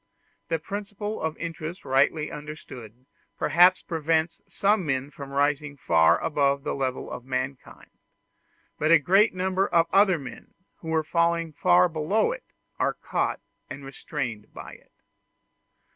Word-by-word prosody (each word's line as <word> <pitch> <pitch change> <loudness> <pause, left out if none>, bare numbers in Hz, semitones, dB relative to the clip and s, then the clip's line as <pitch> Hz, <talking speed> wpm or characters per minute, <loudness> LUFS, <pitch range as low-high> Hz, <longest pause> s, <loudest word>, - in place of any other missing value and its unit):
The 165 - 0
principle 205 +4 -5
of 160 -1 -2
interest 165 +1 -6
rightly 140 +3 +2
understood 130 -6 -10 0.3
perhaps 180 +2 +4
prevents 160 0 -1
some 205 -1 +1
men 135 -2 -2
from 140 -2 -9
rising 145 +1 0
far 80 -9 +4
above 140 -2 +1
the - - -2
level 130 -2 -3
of 125 - -6
mankind; 130 +1 -5 0.9
but 155 - +1
a 165 - +8
great 190 +8 +3
number 190 +1 0
of 165 -1 +3
other 195 -2 +5
men, 135 -4 -11 0.2
who 165 - -12
were 160 -1 +1
falling 170 0 0
far 90 -8 +4
below 165 - 0
it, - - -6 0.4
are - - +1
caught - - -2 0.3
and 135 0 -8
restrained 130 -6 -5
by - - -9
it. - - -18
155 Hz, 140 wpm, -26 LUFS, 135-175 Hz, 0.9 s, a